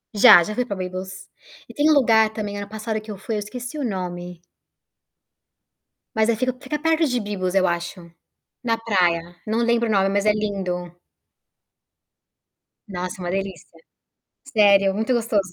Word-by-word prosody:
Já, 205 -4 +8
já 215 +5 -5
fui 250 - 0
pra 205 - -4
Byblos. 185 0 -5 0.6
E - - -10
tem 295 +5 +2
um - - +6
lugar 225 -6 +4
também, 205 -2 -4
ano 205 0 -5
passado 220 +1 -3
que 215 0 -9
eu 205 - -7
fui, 220 +3 -4
eu - - -1
esqueci 240 +7 -7
o 290 - -3
nome 180 -5 -5 1.7
mas 220 +1 +2
aí 230 - +3
fica 255 +3 -1
fica 300 - -4
perto 320 +1 +2
de 250 -2 0
Byblos, 195 -4 -3
eu 190 -1 +4
acho, 170 0 -4 0.5
na 230 -2 +1
praia. 175 -6 0
Não 220 +2 0
lembro 235 0 +2
o - - +1
nome, 195 -1 +3
mas 200 +1 0
é 210 - +4
lindo. 185 -5 -3 1.9
Nossa, 185 -1 -5
uma 175 - -3
delícia. 190 -3 -4 0.9
Sério, 200 -3 +5
muito 220 +5 0
gostoso. 230 -4 +1
205 Hz, 165 wpm, -22 LUFS, 185-230 Hz, 1.9 s, Já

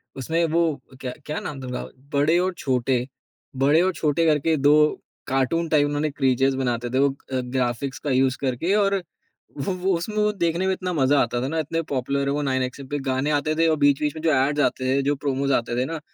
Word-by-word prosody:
उसमें 160 +6 -1
वो 165 -3 +1 0.2
क्या 125 -1 -4
क्या 150 - -3
नाम 135 -2 -6
था 130 - -7
उनका? 125 - -4 0.3
बड़े 145 +4 +3
और 185 +1 0
छोटे, 125 -1 0 0.5
बड़े 140 +5 +4
और 185 0 +1
छोटे 155 +1 +1
करके 155 +1 +2
2 145 +1 +4 0.5
कार्टून 145 +5 0
टाइप 150 -2 +4
उन्होंने 145 +1 -1
क्रीचर्स 135 -1 +2
बनाते 120 -2 -1
थे। 130 +2 0
वो 140 - +5
अ, - - -5 0.3
ग्राफिक्स 125 +1 -2
का 145 - -4
यूज़ 130 -1 +2
करके 135 +7 0
और 200 -1 +3 0.6
वो 140 +7 -2
वो 185 +1 0
उसमें 190 +6 -5
वो 210 0 +3
देखने 170 -1 0
में 190 - +2
इतना 185 -1 -3
मज़ा 140 -2 +3
आता 120 0 -1
था 130 - -1
ना 160 +2 -2
इतने 165 +2 -1
पॉपुलर 140 +1 -1
है 140 - +1
वो 150 - -1
नाइनएक्सएम 130 -1 -2
पे 145 +2 -2
गाने 130 +2 0
आते 150 +1 +1
थे 165 +1 +3
और 160 - +3
बीच-बीच 145 +1 +2
में 155 - -6
जो 160 -1 +2
एड्स 140 +3 +2
आते 130 -1 0
थे 135 +2 +2
जो 145 +1 +1
प्रोमोस 140 0 -1
आते 120 -2 0
थे - - 0
ना, 165 +1 -4
140 Hz, 225 wpm, -23 LUFS, 130-160 Hz, 0.6 s, वो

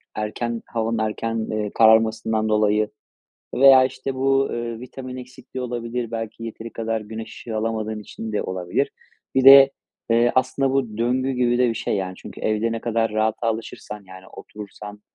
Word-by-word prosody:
erken 115 +2 -3
havanın 115 0 -2
erken, 115 0 -3
eee, 105 -1 -2
kararmasından 110 0 +3
dolayı 105 0 +2 0.7
veya, 135 0 +8
işte 130 +1 -4
bu, 135 +1 +2
ııı, 115 -1 -4
vitamin 130 0 -8
eksikliği 130 +1 -9
olabilir, 120 -1 -4
belki 115 0 -5
yeteri 115 0 -7
kadar 115 -1 -2
güneş 110 +1 -7
ışığı 115 -2 -7
alamadığın 110 -1 -2
için 110 +1 -8
de 105 - -1
olabilir. 95 +9 -2 0.4
Bir 130 - +3
de, 135 0 +10 0.4
eee, 120 +1 +4
aslında 130 +1 +1
bu 125 -6 -1
döngü 130 +3 0
gibi 125 -1 +1
de 125 -1 +3
bir - - -1
şey 105 - -2
yani 95 -1 -3
çünkü - - -11
evde 110 +1 0
ne 115 - -3
kadar 115 -1 0
rahata 110 +2 0
alışırsan, 110 -2 -5
yani 95 0 -12
oturursan, 105 0 -10
115 Hz, 160 wpm, -22 LUFS, 110-125 Hz, 0.7 s, de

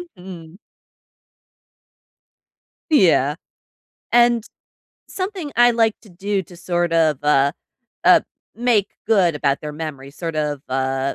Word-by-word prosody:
Mhm. 180 -2 -11 2.3
Yeah, 150 - +4 0.8
and 240 -1 +4 0.7
something 370 -6 -5
I 240 +1 +5
like 225 -2 +1
to 215 - -18
do 195 +2 -2
to 175 +1 -15
sort 175 -1 -1
of, 160 -4 +2
uh 140 -1 +3 0.5
uh, - - +7 0.4
make 230 -4 +1 0.2
good 190 -8 +3
about 140 -1 0
their 150 - -6
memory, 150 -3 -7
sort 165 +3 -6
of, 150 -2 -2
uh, 135 +1 -1
170 Hz, 115 wpm, -20 LUFS, 150-220 Hz, 2.3 s, uh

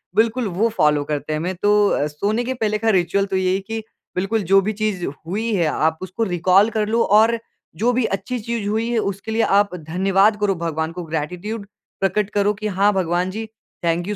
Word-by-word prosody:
बिल्कुल 230 +2 +2
वो 200 +5 +1
फॉलो 150 -1 +3
करते 150 +1 -3
हैं। 155 - -1
मैं 180 +3 -3
तो 205 +2 +3
अ, 145 - +1
सोने 205 +11 -1
के 260 - -2
पहले 215 -4 0
का 225 +1 0
रिचुअल 190 0 +2
तो 195 -1 -3
ये 185 -1 +1
है 190 - +1
कि 225 +3 -5 0.4
बिल्कुल 195 +5 0
जो 195 - +8
भी 215 +3 -2
चीज़ 205 -4 -2 0.2
हुई 220 +6 -1
है 170 - +2
आप 160 +1 +1
उसको 185 +5 -3
रिकॉल 185 +2 +3
कर 215 -2 -1
लो। 230 +1 +2
और 220 +3 +4 0.4
जो 235 +3 +2
भी 255 - +1
अच्छी 240 +6 -3
चीज़ 225 -2 -3
हुई 220 +2 0
है 240 - 0
उसके 200 +2 -3
लिए 225 - +1 0.2
आप 200 -3 0
धन्यवाद 195 +6 +2
करो 200 -2 +2
भगवान 160 -1 -2
को, 175 +1 -6
ग्रैटिट्यूड 180 +7 -4 0.3
प्रकट 195 +1 +1
करो 205 0 +1
कि 215 +1 -4
हाँ 200 +1 +2
भगवान 180 0 0
जी 220 +2 -4 0.4
थैंक 170 +1 0
यू 210 - -2
200 Hz, 215 wpm, -21 LUFS, 180-220 Hz, 0.4 s, जो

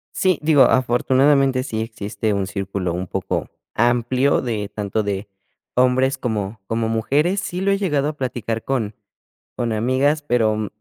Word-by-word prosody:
Sí, 185 -3 +2
digo, 150 -3 +5
afortunadamente 130 +2 +3
sí 110 -4 -3
existe 110 -1 -3
un 100 -1 -1
círculo 95 -3 -3
un 90 +1 -3
poco - - -2 0.3
amplio 120 +4 +2
de 110 -5 -3
tanto 105 +1 -2
de 100 0 -3 0.5
hombres 130 +1 +3
como 110 -2 -3
como 115 0 -1
mujeres. 145 - +1
Sí 180 -1 -4
lo 200 - +2
he 195 - +2
llegado 150 -7 0
a - - -4
platicar 120 -3 -3
con 115 -6 -2 0.6
con 115 -2 -1
amigas, 130 +7 +1
pero, 115 -5 +2
mm, 105 -1 -2
120 Hz, 155 wpm, -21 LUFS, 110-135 Hz, 0.6 s, digo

